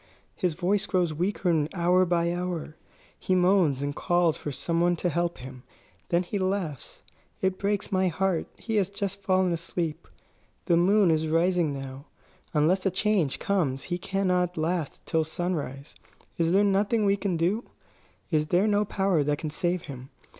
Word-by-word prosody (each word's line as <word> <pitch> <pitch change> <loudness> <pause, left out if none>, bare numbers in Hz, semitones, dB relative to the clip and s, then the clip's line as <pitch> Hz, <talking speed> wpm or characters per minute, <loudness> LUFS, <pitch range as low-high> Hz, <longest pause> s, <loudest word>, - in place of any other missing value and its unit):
His 180 -6 -1
voice 195 +3 0
grows 180 -4 +1
weaker 170 -2 0
hour 180 +1 +3
by 170 0 +1
hour. 175 -3 -4 0.4
He 185 - 0
moans 180 -7 +3
and 145 0 -3
calls 175 -2 +2
for 145 - -5
some 165 +5 -1
one 175 0 +3
to 175 +1 -1
help 170 +1 -1
him; 130 0 -10 0.5
then 170 +1 +2
he 200 +3 -3
laughs. 185 -7 -3 0.4
It 190 0 -1
breaks 205 0 -1
my 190 -1 +2
heart. 180 0 0
He 225 -2 -2
has 195 -2 +2
just 200 0 -4
fallen 185 -2 +2
asleep. 165 -1 -3 0.6
The 170 - +3
moon 190 +2 +4
is 160 0 +1
rising 170 0 +2
now. 135 0 -7 0.5
Unless 175 +6 +2
a - - +4
change 185 -6 +1
comes 150 -10 0
he 175 0 -3
cannot 180 -2 0
last 160 -1 -2
till 160 0 +1
sunrise. 155 -4 -4 0.5
Is 165 0 +2
there 195 +3 +4
nothing 205 +2 +2
we 200 0 +4
can 195 -3 -2
do? 185 +8 0 0.7
Is 155 -1 +1
there 180 +5 +3
no 210 -1 +2
power 190 -5 +1
that 145 0 0
can 155 0 -5
save 175 +2 -1
him? 130 -2 -9
175 Hz, 170 wpm, -27 LUFS, 160-190 Hz, 0.7 s, moon